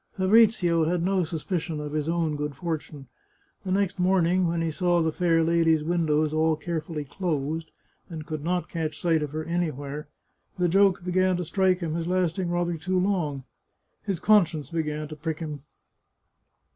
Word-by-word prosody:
Fabrizio 190 -4 +4
had 170 +1 0
no 190 0 +2
suspicion 160 0 -3
of 150 -1 -5
his 155 +1 -2
own 165 -2 0
good 150 -1 -4
fortune. 155 -3 -5 0.6
The 190 - -4
next 195 0 0
morning, 180 0 +3
when 170 0 -1
he 165 - -1
saw 175 +1 +1
the 160 - +1
fair 165 0 +2
lady's 165 -1 +3
windows 155 -2 +1
all 160 0 +2
care 160 +1 -3
fully 155 -2 -6
closed, 160 -1 -3 0.4
and 160 -3 -7
could 155 -2 -5
not 180 +2 -1
catch 160 -3 -4
sight 165 -2 +2
of 150 - -2
her 155 +2 -4
anywhere, 150 -4 -3 0.5
the 180 -1 +2
joke 195 0 +3
began 185 0 +2
to 180 - -3
strike 185 +1 +1
him 160 -2 -2
as 165 0 -2
lasting 180 0 0
rather 175 -1 -1
too 185 +4 -1
long. 170 -8 -1 0.6
His 195 -5 -3
conscience 175 -7 +3
began 155 -2 -2
to 155 - -8
prick 155 +1 -4
him. 150 -3 -5
165 Hz, 170 wpm, -26 LUFS, 155-180 Hz, 0.6 s, Fabrizio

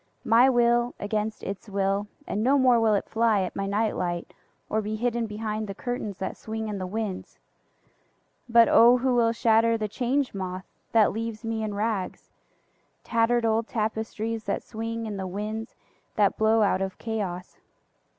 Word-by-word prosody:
My 235 +4 +6
will 240 -1 +2
against 210 +1 -2
its 200 +2 -6
will, 195 +1 0 0.2
and 210 - -2
no 270 +4 +4
more 255 -3 +5
will 220 -2 +3
it 200 - -2
fly 225 -3 +2
at 185 - -4
my 195 0 -2
night 210 +2 0
light 175 -1 -3 0.3
or 220 - 0
be 215 +1 -3
hidden 235 0 -1
behind 215 0 -4
the 195 - -6
curtains 220 -4 -4
that 190 - -4
swing 220 0 -5
in 205 -2 -4
the 185 - -4 1.6
winds.(But 235 -1 +6
O 240 +2 +7
who 255 +1 +1
will 235 -2 +3
shatter 230 0 +3
the 215 -1 -2
Change 255 +5 -1
Moth 185 -1 -5 0.3
that 220 -2 +4
leaves 225 0 -5
me 225 -1 -2
in 215 -2 -3
rags—tattered 225 +2 -3
old 225 0 +1
tapestries 220 0 -3
that - - -2
swing 225 +1 -5
in 210 -2 -4
the 190 -1 -4
winds 215 +4 -5 0.4
that 205 -2 +3
blow 220 0 +3
out 195 -2 +2
of 190 -1 -3
Chaos!) 195 -6 -4
220 Hz, 165 wpm, -26 LUFS, 205-230 Hz, 1.6 s, O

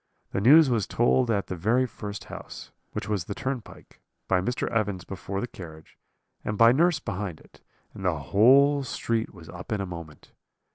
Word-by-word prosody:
The 100 - -1
news 145 +7 +7
was 115 -5 0
told 120 +1 +2
at 100 -4 +1
the 95 - -5
very 115 +9 +2
first 105 -4 -7
house, - - -10 0.2
which - - -4
was 100 -5 -1
the 100 - -5
turn 130 -2 -3
pike, - - -17 0.3
by 95 -1 +2
Mr. 120 +6 -2
Evans 105 -6 -1
before 95 +1 -5
the - - -2
carriage, 80 -7 -12 0.5
and 105 - -3
by 115 +1 +7
nurse 165 +5 +3
behind 100 - -5
it; - - -21 0.3
and 95 - -9
the 90 -4 +1
whole 130 - +5
street 115 -3 -2
was 85 -4 -14
up 115 - -10
in 105 - 0
a 100 - -2
moment. 85 -5 -10
105 Hz, 190 wpm, -26 LUFS, 95-125 Hz, 0.5 s, news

